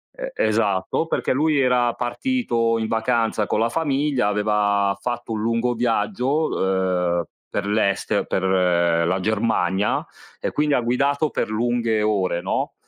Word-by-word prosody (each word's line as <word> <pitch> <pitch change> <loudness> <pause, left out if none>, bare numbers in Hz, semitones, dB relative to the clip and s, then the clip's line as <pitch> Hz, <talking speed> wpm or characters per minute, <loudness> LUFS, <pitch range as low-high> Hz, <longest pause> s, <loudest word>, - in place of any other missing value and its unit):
E - - -6
esatto, 105 - 0
perché - - -1
lui 150 +2 +2
era 125 -2 +2
partito 120 - 0
in 110 - -2
vacanza 115 -1 0
con - - -1
la 115 +1 +2
famiglia, 140 -5 0
aveva 105 -1 +1
fatto 120 -1 -4
un 105 - -3
lungo 115 +2 0
viaggio, 120 +6 0
uhm, 90 -2 0 0.3
per 100 - -3
l'este 100 -1 0
per 95 - -2
l 95 0 +1
ehm, 85 -2 +2
la 95 +2 0
Germania, 105 -2 0 0.3
e - - -3
quindi 150 -1 +1
ha 125 - +3
guidato 140 +5 +1
per - - -2
lunghe 115 -1 0
ore, 95 -5 0
no, 95 - -2
110 Hz, 150 wpm, -22 LUFS, 100-125 Hz, 0.3 s, ha